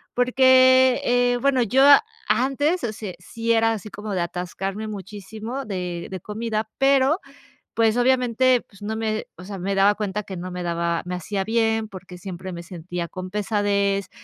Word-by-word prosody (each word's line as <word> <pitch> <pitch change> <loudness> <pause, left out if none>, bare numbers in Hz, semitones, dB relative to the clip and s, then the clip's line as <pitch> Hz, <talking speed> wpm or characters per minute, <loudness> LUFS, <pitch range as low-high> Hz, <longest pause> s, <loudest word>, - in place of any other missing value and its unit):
porque, 260 0 +5
eh 245 0 +2
bueno, 275 -2 +3
yo 255 +4 +3 0.4
antes, 290 +7 +1
o 230 - -1
sea, 210 -3 -7
sí 230 +5 -3
era 225 0 +3
así 215 -1 -6
como 205 0 -6
de 180 - 0
atascarme 190 +4 -4
muchísimo 210 +5 -7
de 180 -5 -4
de 190 -1 -5
comida 220 +1 -3
pero, 275 +5 +4 0.5
pues 225 0 +2
obviamente, 250 0 +3
pues 200 -1 -18
no 215 +2 -3
me 220 -1 -2
o 180 - -10
sea, 200 +1 -7
me 195 +2 -2
daba 195 +1 +4
cuenta 210 0 -3
que 190 - -7
no 180 +1 -6
me 180 0 -5
daba 170 -1 -1
me 180 - -3
hacía 190 +2 -3
bien, 225 -1 +1
porque 185 -2 -11
siempre 185 0 -7
me 170 -1 -7
sentía 170 0 -6
con 185 0 -7
pesadez, 200 -1 0
210 Hz, 175 wpm, -23 LUFS, 185-245 Hz, 0.5 s, porque